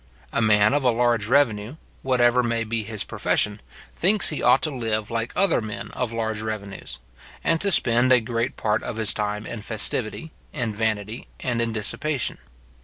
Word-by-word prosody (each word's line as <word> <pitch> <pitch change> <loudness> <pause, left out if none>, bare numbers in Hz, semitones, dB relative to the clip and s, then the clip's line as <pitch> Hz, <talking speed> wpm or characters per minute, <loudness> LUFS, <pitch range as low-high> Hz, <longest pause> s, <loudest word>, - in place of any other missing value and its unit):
A - - +1
man 105 0 +4
of 145 -1 +1
a 125 - +4
large 120 -3 +1
revenue, 120 -2 +1 0.3
whatever 125 -1 +3
may 115 -1 -1
be 115 0 -2
his 110 -1 -5
profession, 105 0 -1 0.3
thinks 200 +4 +3
he 150 - -4
ought 125 +2 +4
to 155 - +3
live 110 -3 -2
like 115 0 -2
other 195 -10 +3
men 110 +1 -7
of 125 -3 -3
large 110 -2 -2
revenues; 105 -3 -6 0.5
and 165 -1 +1
to 200 - +1
spend 125 -6 +3
a 125 - +7
great 115 +2 -3
part 110 0 0
of - - -5
his 110 -1 +5
time 105 0 -3
in 115 - -6
festivity, 110 +7 -1 0.2
in 115 -4 -2
vanity, 110 +1 -3
and 120 -2 -1
in 115 -1 -1
dissipation. 120 +6 -2
115 Hz, 180 wpm, -23 LUFS, 110-125 Hz, 0.5 s, a